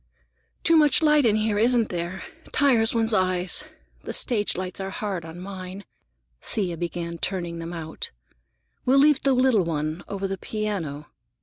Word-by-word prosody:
"Too 330 - +4
much 305 0 +5
light 300 -3 +5
in 210 - +3
here, 215 -1 +1
isn't 235 0 +3
there? 175 +2 -4 0.3
Tires 240 -6 +3
one's 225 0 +3
eyes. 185 +6 +1 0.4
The - - -6
stage 210 -7 +2
lights 185 0 -4
are 195 0 -3
hard 195 -3 -4
on 165 +1 -9
mine." 190 +1 -8 0.6
Thea 185 -5 -3
began 170 0 -4
turning 175 -3 -3
them 165 +1 -6
out. 160 -2 -5 0.7
"We'll 260 +2 +3
leave 290 0 +5
the 275 - +3
little 255 -6 +3
one, 155 0 -3
over 195 -1 -3
the 195 -1 -4
piano." 190 -10 -4
195 Hz, 160 wpm, -25 LUFS, 175-230 Hz, 0.7 s, much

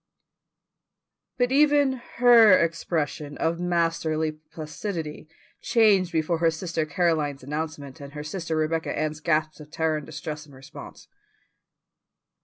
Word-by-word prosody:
But 245 0 +1
even 285 -2 +3
her 230 -5 +7
expression 155 -3 -2
of 165 +1 -1
masterly 165 -3 0
placidity 155 +1 -7 0.3
changed 205 -6 +3
before 160 +1 0
her 165 0 +4
sister 165 -1 -3
Caroline's 150 -4 0
announcement 150 0 -5
and 140 0 -10
her 150 -1 -6
sister 160 +1 -4
Rebecca 160 +1 -1
Ann's 155 0 -2
gasp 155 -1 0
of 150 -1 -12
terror 160 0 0
and 150 - -7
distress 150 0 -7
in 145 - -17
response. 135 +3 -12
160 Hz, 120 wpm, -25 LUFS, 155-175 Hz, 0.3 s, her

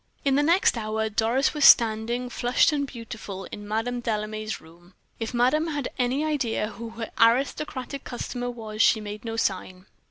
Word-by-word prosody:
In 275 - +3
the 285 - +3
next 330 -5 +3
hour 220 0 -2
Doris 230 +7 +1
was 300 -2 -1
standing, 235 +2 +5
flushed 245 +4 +2
and 285 -1 -1
beautiful, 220 -5 -8
in 205 0 -8
Madame 225 +3 -2
Delame's 215 -1 -3
room. 175 +3 -19 0.2
If 225 -1 -3
madame 255 +7 +2
had 290 -4 -3
any 255 +5 +1
idea 250 -8 -1
who 225 +2 -8
her 225 -1 -5
aristocratic 260 +3 +1
customer 245 0 -4
was 220 -3 -5
she 220 - +5
made 210 0 -7
no 225 -1 -4
sign. 185 -3 -2
230 Hz, 165 wpm, -25 LUFS, 215-255 Hz, 0.2 s, standing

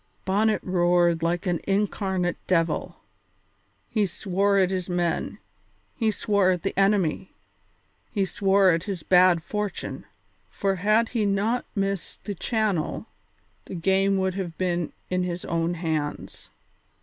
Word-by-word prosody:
Bonnet 210 +3 +2
roared 175 -2 +2
like 170 +3 0
an 175 -3 0
incarnate 195 -3 0
devil; 165 -2 0 0.9
he 210 -3 +1
swore 200 +2 0
at 190 -1 +3
his 185 -1 -3
men, 175 -1 -1 0.6
he 225 -3 +1
swore 205 -3 +2
at 180 -2 0
the 195 - -1
enemy, 195 -3 +2 0.8
he 200 -3 0
swore 195 0 +3
at 165 +1 -1
his 190 -5 -4
bad 180 -2 +5
fortune, 210 +2 -4 0.4
for 195 -1 -1
had 215 +4 +2
he 230 -3 0
not 205 +5 0
missed 195 -2 -3
the 205 - -4
channel 210 -3 -1 0.6
the - - -7
game 195 +3 +2
would 190 -1 0
have 175 -4 -5
been 175 -3 -1 0.2
in 180 0 +1
his 180 -1 -3
own 165 +1 -1
hands. 160 -3 -4
190 Hz, 135 wpm, -25 LUFS, 175-200 Hz, 0.9 s, bad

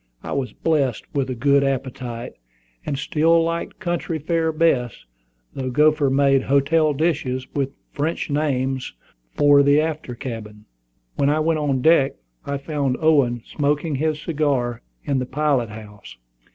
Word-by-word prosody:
I - - -6
was 135 -2 -2
blessed 140 -8 0
with 135 -2 -1
a 130 - -3
good 140 +3 +3
appetite, 125 -3 -3 0.5
and 140 - -1
still 160 +4 +2
liked 165 0 -3
country 175 -2 -2
fare 160 +1 0
best, 155 -8 0 0.5
though 130 -1 -3
Gopher 150 +1 +3
made 135 0 +3
hotel 140 +4 +2
dishes, 135 -5 -1
with 140 -2 -1 0.2
French 155 +4 -2
names, 135 -3 -1 0.4
for 145 -1 +6
the 145 +1 +4
after 155 -5 -3
cabin. 110 -4 -7 0.5
When 140 - +2
I 150 +1 +2
went 160 0 +1
on 135 -4 0
deck, 160 -4 +4 0.3
I 140 0 -2
found 140 -3 -2
Owen 135 -7 +2
smoking 150 +1 -1
his 155 +1 -1
cigar 140 -7 -1 0.2
in 140 -2 0
the 125 - -3
pilot 140 -4 0
house. 105 - -11
140 Hz, 145 wpm, -22 LUFS, 130-155 Hz, 0.5 s, for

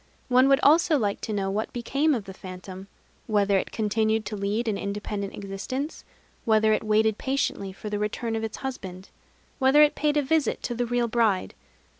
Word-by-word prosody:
One 255 +1 +5
would 275 0 +5
also 315 +1 +5
like 205 -5 -1
to 220 - -4
know 195 -2 -1
what 215 +2 -2
became 275 +5 +1
of 220 -5 -4
the 190 - -8
phantom, 185 +1 -9 0.4
whether 205 -2 +2
it - - -5
continued 220 0 0
to 210 - -4
lead 205 +4 -1
an 215 - +1
independent 200 0 -4
existence; 205 +9 -5 0.4
whether 220 -1 +3
it - - 0
waited 215 0 +2
patiently 265 -7 -1
for 195 +3 -9
the 210 -1 -2
return 225 +2 -2
of 220 - -2
its 220 -1 -4
husband; 190 -8 -6 0.5
whether 270 +3 +6
it 295 - +4
paid 300 0 0
a 295 - +2
visit 310 -2 0
to - - -2
the 240 0 -2
real 240 0 +1
bride. 220 -5 +1
220 Hz, 190 wpm, -26 LUFS, 200-255 Hz, 0.5 s, whether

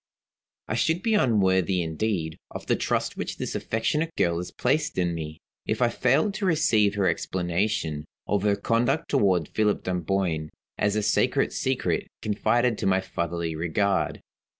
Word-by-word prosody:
I - - -2
should 160 +9 +1
be 225 - +2
unworthy 95 - +3
indeed 80 -1 -2
of - - -8
the - - +2
trust - - -1
which - - -4
this - - -4
affectionate 150 +9 -1
girl 85 -1 +2
has 90 +1 -4
placed 150 +5 0
in 90 -2 +1
me, 80 -1 -5 0.3
if 110 - 0
I 120 -2 +3
failed 135 - +2
to 205 0 -3
receive 110 - +3
her 100 -2 +2
explanation 85 -2 -1 0.2
of 105 -2 0
her 100 0 +2
conduct 120 +8 0
toward 90 -6 +2
Philip 105 -1 +1
Dunboyne, 90 -3 -1 0.3
as 105 0 +2
a 105 - 0
sacred - - +2
secret - - -1 0.2
confided 115 +2 +1
to - - 0
my 95 0 +3
fatherly 85 -3 -3
regard. 95 +5 0
100 Hz, 155 wpm, -26 LUFS, 85-115 Hz, 0.3 s, unworthy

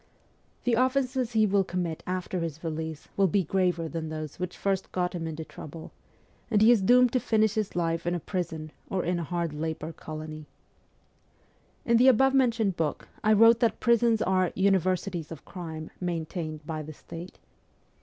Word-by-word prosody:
The 245 - +1
offences 255 0 +1
he 220 -1 +4
will 200 -1 +3
commit 175 -3 -3
after 185 0 -2
his 165 -1 -4
release 160 -1 -4
will 195 -1 +4
be 195 +2 +2
graver 175 -1 0
than 160 -1 -4
those 155 -1 -6
which 180 0 -4
first 195 -1 -1
got 180 -1 -1
him 165 -2 -3
into 160 0 -5
trouble; 160 +1 -10 0.6
and 210 - +3
he 220 +3 +7
is 235 -4 +4
doomed 245 +4 +5
to 255 - +3
finish 220 -3 +2
his 215 -5 -2
life 165 -1 -1
in 175 - +1
a - - -2
prison 160 -3 -4 0.2
or 190 -2 -1
in 175 0 0
a - - -2
hard 170 -1 -2
labour 160 +1 -4
colony. 155 -1 -8 1.4
In 235 -1 +4
the 250 +3 +5
above 265 +2 +5
mentioned 230 -7 +2
book 160 -3 -2
I 215 - +5
wrote 230 +2 +7
that 235 -2 +1
prisons 235 -1 +3
are 185 -1 +2
' - - -34
universities 185 -3 0
of 160 - -9
crime, 160 -4 -7
maintained 160 -3 -4
by 155 -1 -4
the 155 +1 -8
state.' 170 +4 -10
180 Hz, 180 wpm, -28 LUFS, 160-215 Hz, 1.4 s, he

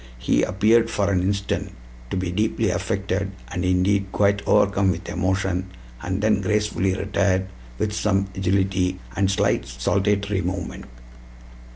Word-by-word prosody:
He - - +1
appeared 110 +5 +3
for 100 -3 0
an 90 -2 +2
instant 100 +1 -2 0.3
to - - -2
be 90 -1 -2
deeply 110 +1 0
affected, 95 +1 -2 0.2
and, 90 - -3
indeed, 95 +2 +1
quite 100 0 +2
overcome 100 -2 +3
with 90 -1 -2
emotion, 95 0 -1 0.3
and 95 +4 -3
then 105 -2 +3
gracefully 95 -1 0
retired, 100 -1 +1 0.3
with 105 - -1
some 100 -2 +1
agility 95 -1 0 0.2
and 100 -1 +2
a - - +2
slight 95 - +1
saltatory 100 - 0
movement." 90 -1 -4
95 Hz, 140 wpm, -23 LUFS, 95-100 Hz, 0.3 s, appeared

